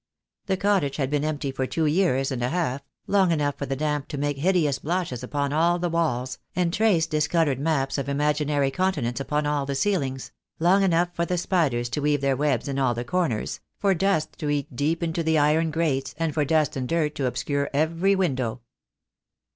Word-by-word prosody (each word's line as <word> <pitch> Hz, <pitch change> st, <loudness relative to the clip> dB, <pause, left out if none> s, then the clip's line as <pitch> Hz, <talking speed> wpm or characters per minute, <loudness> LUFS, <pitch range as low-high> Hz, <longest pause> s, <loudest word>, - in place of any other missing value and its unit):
The 190 Hz, -1 st, +1 dB
cottage 190 Hz, -9 st, +1 dB
had 135 Hz, -2 st, -1 dB
been 145 Hz, -1 st, +1 dB
empty 150 Hz, -2 st, -2 dB
for 130 Hz, 0 st, -2 dB
two 160 Hz, +3 st, -1 dB
years 150 Hz, -5 st, +2 dB
and 125 Hz, -2 st, -3 dB
a 120 Hz, -, 0 dB
half, 155 Hz, -5 st, -1 dB, 0.2 s
long 195 Hz, -3 st, +3 dB
enough 145 Hz, -3 st, 0 dB
for 140 Hz, -, -3 dB
the 135 Hz, -, -1 dB
damp 150 Hz, 0 st, -2 dB
to 145 Hz, -, -5 dB
make 145 Hz, 0 st, -1 dB
hideous 155 Hz, -5 st, +2 dB
blotches 165 Hz, -5 st, -2 dB
upon 140 Hz, +2 st, -2 dB
all 170 Hz, +3 st, +3 dB
the 175 Hz, -1 st, -2 dB
walls, 130 Hz, -7 st, -1 dB, 0.2 s
and 175 Hz, -2 st, +1 dB
trace 200 Hz, -7 st, +3 dB
discoloured 155 Hz, -3 st, +1 dB
maps 140 Hz, -2 st, 0 dB
of 140 Hz, -, -3 dB
imaginary 145 Hz, -1 st, +1 dB
continents 145 Hz, -9 st, -1 dB
upon 150 Hz, +2 st, -1 dB
all 145 Hz, -2 st, 0 dB
the 140 Hz, -, -2 dB
ceilings; 135 Hz, -6 st, -1 dB, 0.3 s
long 180 Hz, +4 st, +4 dB
enough 175 Hz, -2 st, +2 dB
for 170 Hz, 0 st, -1 dB
the 180 Hz, -, 0 dB
spiders 155 Hz, -10 st, +1 dB
to 150 Hz, -, -2 dB
weave 145 Hz, -1 st, +1 dB
their 140 Hz, -1 st, +2 dB
webs 140 Hz, -3 st, 0 dB
in 140 Hz, -1 st, -2 dB
all 125 Hz, -3 st, +2 dB
the 120 Hz, +1 st, -4 dB
corners, 140 Hz, -7 st, -1 dB, 0.2 s
for 195 Hz, -1 st, +2 dB
dust 175 Hz, -3 st, 0 dB
to 150 Hz, -, -2 dB
eat 145 Hz, -3 st, -2 dB
deep 160 Hz, +6 st, 0 dB
into 165 Hz, 0 st, -1 dB
the 160 Hz, -1 st, +2 dB
iron 155 Hz, +2 st, +3 dB
grates, 150 Hz, -4 st, -1 dB
and 165 Hz, -2 st, -1 dB
for 150 Hz, -2 st, +1 dB
dust 155 Hz, 0 st, +1 dB
and 130 Hz, -2 st, -3 dB
dirt 160 Hz, -3 st, +1 dB
to 135 Hz, -3 st, -1 dB
obscure 140 Hz, +3 st, -1 dB
every 165 Hz, +7 st, +2 dB
window. 130 Hz, -10 st, -1 dB
150 Hz, 200 wpm, -25 LUFS, 135-170 Hz, 0.3 s, long